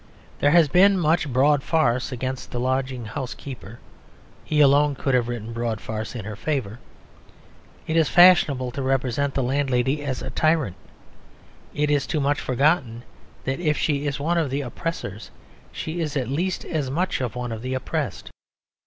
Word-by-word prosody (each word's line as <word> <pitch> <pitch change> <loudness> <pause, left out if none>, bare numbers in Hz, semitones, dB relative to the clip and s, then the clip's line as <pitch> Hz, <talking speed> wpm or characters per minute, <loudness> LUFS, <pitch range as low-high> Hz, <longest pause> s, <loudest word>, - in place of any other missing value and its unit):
There 145 - +4
has 165 0 +5
been 190 +6 +5
much 160 -3 +1
broad 140 +3 +3
farce 130 -6 +1
against 130 +1 -4
the 120 - -4
lodging 130 -1 -1
house 125 +4 -5
keeper: 120 -5 -9 0.7
he 150 - -1
alone 145 0 +5
could 135 0 -1
have 120 -2 +2
written 115 -1 -5
broad 115 -1 -2
farce 110 +3 -5
in 110 -5 -6
her 110 -1 -6
favour. 120 -3 -3 1.1
It 160 - -2
is 160 -3 +3
fashionable 155 -8 +5
to 135 - -5
represent 135 +1 0
the 135 - +1
landlady 135 +1 0
as 135 -3 -3
a - - -5
tyrant; 155 - +1 1.0
it 150 0 +1
is 145 -2 +1
too 160 - -1
much 145 +1 +1
forgotten 130 -3 +1 0.4
that 135 +1 -2
if 150 -4 +1
she 145 -1 0
is 140 0 -2
one 170 +4 +1
of 155 -4 0
the 140 +2 -1
oppressors 120 - -5 0.4
she 160 +2 -5
is 150 -2 -2
at 125 -3 -2
least 175 +7 -2
as 150 -5 -2
much 180 +7 -1
one 125 -1 -3
of 110 -1 -5
the 130 +1 -3
oppressed. 130 - -4
135 Hz, 170 wpm, -23 LUFS, 125-150 Hz, 1.1 s, has